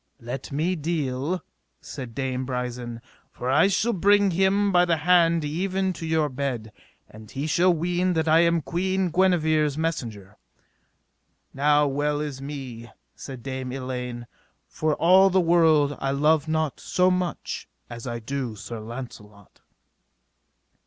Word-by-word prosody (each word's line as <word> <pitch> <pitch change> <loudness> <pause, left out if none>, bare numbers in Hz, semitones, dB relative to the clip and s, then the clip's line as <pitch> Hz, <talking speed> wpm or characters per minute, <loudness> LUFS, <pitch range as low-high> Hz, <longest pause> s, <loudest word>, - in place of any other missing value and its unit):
Let 125 +4 -6
me 160 +6 0
deal, 155 0 -2 0.4
said 125 -5 -8
Dame 130 -1 -2
Brisen, 125 -2 -4 0.3
for 125 +1 -4
I 155 +7 +5
shall 210 +4 +1
bring 200 +1 +4
him 195 +3 +2
by 175 -1 +5
the 170 -2 +2
hand 165 0 +3
even 185 +4 -1
to 165 -1 -6
your 160 -1 +2
bed, 130 -5 -4 0.4
and 110 0 -14
he 140 +2 -4
shall 175 +4 +3
ween 175 +2 0
that 160 -1 0
I 160 +1 +5
am 170 -2 +3
Queen 185 +2 -1
Guenever's 155 -5 +2
messenger. 115 - -4 1.2
Now 145 +2 +3
well 145 +1 0
is 145 -3 -5
me, 130 -5 -7 0.2
said 130 -4 -9
Dame 130 -1 -4
Elaine, 125 -2 -5 0.4
for 155 -1 -1
all 190 +3 +5
the 190 0 +3
world 160 -4 +4
I 135 - -1
love 150 +3 +2
not 155 -2 -1
so 185 0 +2
much 180 -4 -3 0.2
as 120 +1 -8
I 120 -1 -3
do 120 0 -4
Sir 115 +3 -7
Launcelot. 110 -3 -10
150 Hz, 140 wpm, -25 LUFS, 130-175 Hz, 1.2 s, I